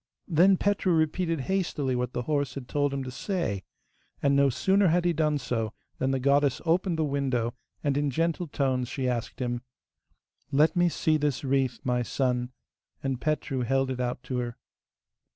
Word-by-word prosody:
Then 185 +3 +5
Petru 200 -2 +1
repeated 165 0 +1
hastily 150 -6 -1
what 125 0 -2
the 125 - -2
horse 145 -3 -1
had 135 -3 -6
told 145 +1 +1
him 135 -1 -2
to 130 - -6
say, 130 - -2 0.6
and 140 -1 +2
no 140 0 +5
sooner 195 +9 +3
had 175 +1 +2
he 175 - +3
done 150 -2 +1
so 115 -5 -2 0.3
than 130 - +1
the 135 0 +1
goddess 140 0 +3
opened 170 +1 +2
the 160 - +1
window, 135 -5 0 0.3
and 140 -2 +1
in 145 0 +1
gentle 165 +4 0
tones 130 -3 0
she 130 -2 -2
asked 120 -2 -2
him: 120 -1 -2 0.9
'Let 150 +3 +4
me 175 0 +4
see 155 -1 +1
this 145 -3 -1
wreath, 135 -3 0
my 125 -1 +1
son,' 125 0 -1 0.5
and 135 -2 -2
Petru 155 -3 -1
held 135 +2 +1
it 130 - -4
out 125 0 -2
to 125 -2 -2
her. 120 -1 -4
140 Hz, 180 wpm, -28 LUFS, 125-160 Hz, 0.9 s, Then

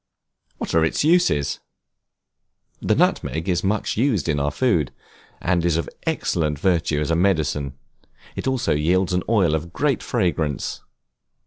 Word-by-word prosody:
What - - -4
are 80 - +4
its 80 - +1
uses? 155 - +2 1.2
The - - +2
nutmeg 80 +4 0
is 90 -2 0
much 105 +2 -1
used 115 - +1
in 75 -3 +1
our 70 +1 +1
food, 85 - +1 0.5
and 85 -1 +1
is 85 -2 +2
of 85 - -2 0.2
excellent 75 -3 0
virtue 80 -3 +1
as 75 - -1
a - - +3
medicine. 75 -7 0 0.6
It - - -4
also 130 -10 +1
yields 90 +5 +1
an 90 - +1
oil 95 -9 +3
of 85 +2 -3
great - - 0
fragrance. 80 -5 -1
85 Hz, 145 wpm, -22 LUFS, 75-95 Hz, 1.2 s, are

